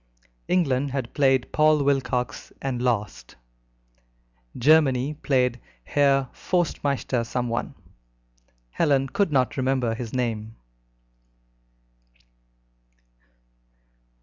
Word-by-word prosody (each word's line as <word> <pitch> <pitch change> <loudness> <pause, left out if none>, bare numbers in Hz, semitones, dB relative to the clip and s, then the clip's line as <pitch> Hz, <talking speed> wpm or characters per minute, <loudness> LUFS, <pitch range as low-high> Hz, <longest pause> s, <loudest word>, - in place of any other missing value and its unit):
England 140 -6 +1
had 130 -3 -4
played 135 -3 +2
Paul 155 -1 +3
Wilcox, 135 -3 -1
and 130 -3 -3
lost; 105 - -2 1.2
Germany 140 -1 +3
played 125 -5 0 0.2
Herr 135 - +2
Forstmeister 140 -8 -1
someone 120 0 -3 1.0
Helen 135 - +1
could 195 +5 0
not 130 -2 +1
remember 130 -3 0
his 115 0 -6
name. 115 -3 -3
130 Hz, 75 wpm, -24 LUFS, 125-140 Hz, 1.2 s, Paul